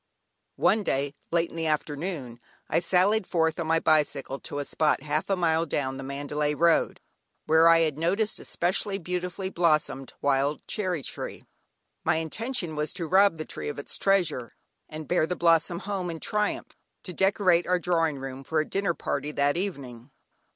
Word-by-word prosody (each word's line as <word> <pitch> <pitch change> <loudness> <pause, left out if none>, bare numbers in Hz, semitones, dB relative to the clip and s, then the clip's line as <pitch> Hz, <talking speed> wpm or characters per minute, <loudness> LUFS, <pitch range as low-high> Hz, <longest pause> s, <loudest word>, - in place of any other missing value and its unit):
One 220 - +3
day, 140 -6 -1 0.2
late 170 0 +1
in - - -11
the 165 -1 -1
afternoon, 150 -4 -3 0.3
I 165 - +2
sallied 190 +4 +2
forth 160 -2 +1
on 165 - -2
my 165 0 +3
bicycle 145 -4 +1
to 145 - -6
a 145 - -2
spot 150 -2 +1
half 150 +3 -1
a 195 - +3
mile 165 -2 +1
down 135 -2 -2
the 135 - -6
Mandalay 145 +2 -2
road, 170 +1 +2 0.5
where 160 +1 +5
I 165 0 +6
had 155 -2 0
noticed 200 +6 0
a - - -10
specially 190 +3 0
beautifully 180 +1 -4
blossomed 155 -6 +1
wild 140 +1 0
cherry 185 -8 -2
tree. - - -6 0.6
My 160 0 +2
intention 175 - -3
was 150 0 -2
to 170 - -3
rob 190 +1 +4
the 155 - -5
tree - - -5
of 145 - -6
its 145 - -7
treasure, 170 -11 +1 0.3
and 155 -1 -7
bear 175 -3 +2
the 180 - -2
blossom 170 0 +3
home 195 -1 -3
in 165 -1 -5
triumph 210 +3 -2 0.3
to 180 - -7
decorate 190 -2 +3
our 180 0 +3
drawing 165 -4 +1
room 135 0 -7
for 155 +3 0
a 155 - -1
dinner 195 -3 -1
party 145 +1 -3
that 145 0 +2
evening. 140 - -5
165 Hz, 180 wpm, -27 LUFS, 145-180 Hz, 0.6 s, I